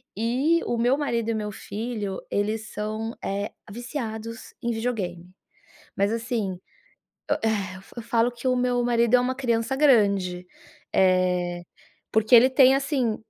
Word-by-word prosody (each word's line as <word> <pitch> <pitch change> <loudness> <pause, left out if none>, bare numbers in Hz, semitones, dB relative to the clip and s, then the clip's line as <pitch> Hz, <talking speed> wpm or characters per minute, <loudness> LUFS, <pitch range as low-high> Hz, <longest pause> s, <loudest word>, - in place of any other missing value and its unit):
E 260 +10 +1
o 235 - -1
meu 245 +4 +2
marido 235 -6 -1
e - - +1
o - - -2
meu 210 -1 -3
filho, 210 -2 -5
eles 215 +1 -1
são, 215 +2 -4
eh, 200 +1 -2 0.2
viciados 230 -2 -6
em 235 - -1
videogame, 200 -7 -3 0.7
mas, 200 +2 +1
assim, 225 -5 -2 0.7
eh, - - +3
e 200 -4 -1 0.2
eu - - -3
falo 235 +1 +1
que 240 +2 -5
o 255 - +3
meu 245 -1 +1
marido 235 0 +3
é 250 - +5
uma 255 +1 -1
criança 235 -1 0
grande, 200 -10 +3 0.5
eh, 180 -2 +2 0.5
porque 220 +2 +4
ele 250 +3 +8
tem 260 0 +6
assim 270 -5 0
230 Hz, 150 wpm, -25 LUFS, 205-245 Hz, 0.7 s, ele